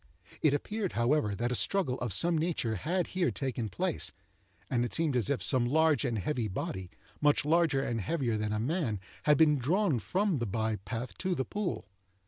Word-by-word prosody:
It 150 -2 +4
appeared, 205 +5 -3
however, 120 -3 +1
that 120 +4 -1
a - - +1
struggle 135 -1 0
of 120 -3 -2
some 170 - +3
nature 155 -8 0
had 175 - -1
here 185 -2 +2
taken 125 -5 -3
place, 90 - 0 0.6
and 120 -2 +1
it 120 - -2
seemed 160 -5 +1
as 115 -6 +1
if 140 - 0
some 125 -3 +3
large 155 0 +3
and 120 -3 -1
heavy 120 +2 -1
body, 95 -1 -4 0.3
much 145 -1 +3
larger 160 -4 +3
and 115 -4 -2
heavier 120 - -1
than 105 0 -2
a 105 - -1
man, 125 - -1 0.3
had 150 -1 +5
been 150 -2 +4
drawn 165 - +1
from 185 - 0
the 120 - -2
by 110 +1 -1
path 115 +6 -6
to 185 -1 0
the 130 - -1
pool. 205 - -3
135 Hz, 195 wpm, -30 LUFS, 115-165 Hz, 0.6 s, had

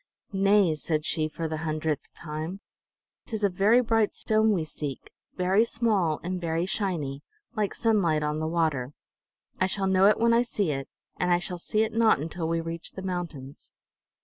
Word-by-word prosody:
"Nay," 195 -3 +4
said 155 0 -2
she, 155 -1 0
for 160 +1 -4
the 155 0 -3
hundredth 155 -1 -2
time. 160 +4 -5 0.7
"Tis 220 -2 -4
a 200 - +4
very 205 +7 +4
bright 225 -3 +1
stone 220 0 +2
we 180 -6 +1
seek, 145 -3 -6 0.2
very 190 +4 +3
small 210 -10 +1
and 180 +1 -3
very 165 0 0
shiny, 170 -9 -2 0.3
like 210 -2 -1
sunlight 180 -9 +2
on 150 +1 -1
the 155 - -1
water. 155 -6 0 0.7
I 185 - +3
shall 195 +1 -1
know 190 0 +5
it 210 - +4
when 230 0 +4
I 235 - +5
see 210 -8 -1
it, 135 -1 -4 0.3
and 180 - 0
I 175 - +5
shall 180 0 -4
see 215 +5 +1
it 220 0 -3
not 225 -6 +4
until 165 +2 -3
we 165 0 0
reach 165 0 -6
the 190 - -7
mountains." 170 -7 -6
180 Hz, 180 wpm, -27 LUFS, 155-205 Hz, 0.7 s, know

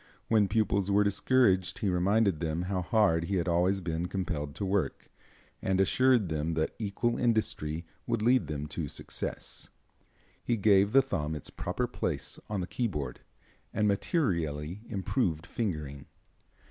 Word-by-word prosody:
When 110 -3 +4
pupils 100 -1 +1
were 100 +1 +4
discouraged 100 -2 +2
he 105 - -1
reminded 95 0 +2
them 80 +1 -1
how 90 0 -1
hard 85 -4 +2
he 100 - -1
had 85 -2 0
always 90 +3 +2
been 85 0 -2
compelled 80 -7 -3
to 100 - -3
work, 95 -7 -1 0.5
and 95 0 +1
assured 120 +2 +4
them 80 +1 -1
that 80 0 0
equal 115 +3 -1
industry 90 -9 0 0.2
would 115 -2 0
lead 125 +2 +4
them 75 -1 -3
to 80 -4 -3
success. - - -5 0.7
He 120 - 0
gave 100 -1 +4
the 135 +2 +6
thumb 80 - -2
its 75 - -8
proper - - -2
place - - -2
on 105 -3 -1
the - - -2
keyboard, 75 - -3 0.6
and 105 - +2
materially 90 - 0
improved 95 - -1
fingering. 75 -10 -4
95 Hz, 145 wpm, -30 LUFS, 80-105 Hz, 0.7 s, the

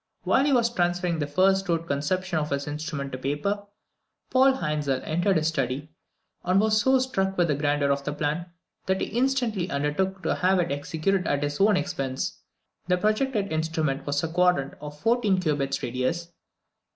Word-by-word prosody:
While 270 - +3
he 290 - +2
was 235 -2 +3
transferring 175 -3 0
the 145 - -1
first 190 +5 +2
rude 165 -1 0
conception 170 +4 -1
of 150 0 -2
his 140 0 -2
instrument 145 -2 -4
to 130 - -5
paper, 175 +10 -2 0.6
Paul 265 +1 +5
Hainzel 150 - -1
entered 175 +4 +1
his 155 0 +1
study, 140 0 -2 0.5
and 185 +2 +3
was 215 0 +3
so 265 +3 +4
struck 195 -7 -1
with 175 -2 +2
the - - +3
grandeur 145 0 +1
of 140 0 0
the 150 - -2
plan, 150 +4 -2 0.4
that 190 0 +1
he - - -2
instantly 240 -7 +1
undertook 175 +7 -1
to - - +1
have 185 +1 +2
it 170 -5 0
executed 160 +6 -1
at 145 0 0
his 145 +4 -2
own 205 -1 +5
expense. 135 -2 -3 0.5
The 180 0 +3
projected 215 -1 0
instrument 155 -3 -1
was 145 +1 0
a - - 0
quadrant 175 -4 +2
of 150 0 -8
fourteen 225 -3 +2
cubits 140 -5 -1
radius! 130 +8 -2
170 Hz, 175 wpm, -26 LUFS, 145-195 Hz, 0.6 s, Paul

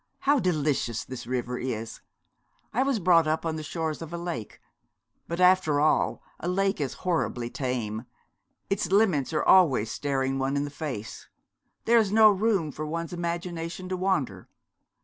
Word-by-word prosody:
How 285 0 +3
delicious 150 - 0
this 130 -2 -8
river 125 0 -2
is! 115 -3 -4 0.7
I 250 - +1
was 270 -2 +1
brought 170 -4 +4
up 155 +2 0
on 160 -1 -1
the 155 - -4
shores 160 0 -3
of 165 -1 -7
a 170 - -4
lake; 170 -11 -5 0.7
but 170 +1 -4
after 180 -5 +4
all 155 +1 +2 0.2
a 170 - -5
lake 195 -1 0
is 135 -3 -2
horribly 125 -9 -1
tame. 120 -4 -3 0.6
Its 190 -3 -1
limits 190 -10 +3
are 155 - 0
always 135 - +5
staring 135 -1 -1
one 135 +1 0
in 140 - 0
the 145 - -5
face. 130 -8 -6 0.6
There 235 0 +5
is 210 -3 +1
no 215 0 +7
room 195 -6 +1
for 155 +2 -5
one's 165 +2 -4
imagination 170 +1 -4
to 185 - -1
wander. 150 - -1
160 Hz, 165 wpm, -27 LUFS, 135-185 Hz, 0.7 s, no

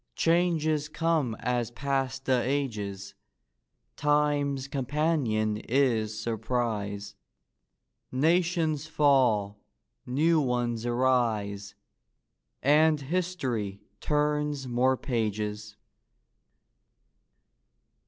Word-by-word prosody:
Changes 160 -3 +1
come 155 -8 0
as 120 -1 -1
pass 135 0 -2
the 130 -2 +1
ages. 105 -8 -3 0.8
Time's 145 -2 +1
companion 135 -6 0
is 110 -3 0
surprise; 110 -3 -2 1.0
Nations 160 +1 +1
fall; 125 -10 +2 0.5
new 155 +5 +3
ones 120 -3 -1
arise; 110 -5 0 0.9
And 150 +2 +4
Hist'ry 135 - -2 0.2
turns 150 -2 0
more 130 +2 +2
pages. 105 -3 -3
130 Hz, 65 wpm, -28 LUFS, 110-150 Hz, 1.0 s, And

